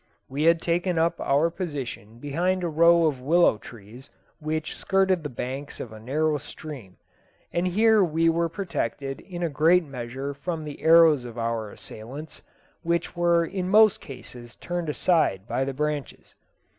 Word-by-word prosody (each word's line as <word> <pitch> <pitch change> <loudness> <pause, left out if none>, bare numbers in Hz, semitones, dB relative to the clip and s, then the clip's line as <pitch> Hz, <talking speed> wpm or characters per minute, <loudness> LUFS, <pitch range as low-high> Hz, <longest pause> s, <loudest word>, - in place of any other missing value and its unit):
We 135 +3 -4
had 165 0 +4
taken 175 +1 0
up 165 +1 +1
our 145 +5 +2
position 135 - -6
behind 175 +8 -1
a - - 0
row 170 +1 +5
of 140 -5 0
willow 155 -5 +3
trees 120 +4 -13 0.3
which 155 0 -3
skirted 190 -2 +1
the 150 - -5
banks 130 +3 -6
of 115 - -6
a 110 - -10
narrow 150 +6 0
stream, 130 -10 -10 0.6
and 175 +1 0
here 215 +3 +4
we 165 -1 +1
were 165 0 +2
protected 145 - -4
in 175 -3 -7
a - - +2
great 165 +4 +3
measure 135 +1 -5
from 160 +3 -5
the 150 -1 -8
arrows 160 -4 +6
of 120 -1 -9
our 115 -2 -2
assailants, 130 +10 -10 0.4
which 170 +1 -1
were 170 -1 +3
in 185 +1 -4
most 215 +1 +5
cases 120 -2 -11
turned 175 -2 -4
aside 150 - +1
by 130 - -1
the 135 0 -3
branches. 150 0 -4
155 Hz, 160 wpm, -25 LUFS, 130-170 Hz, 0.6 s, arrows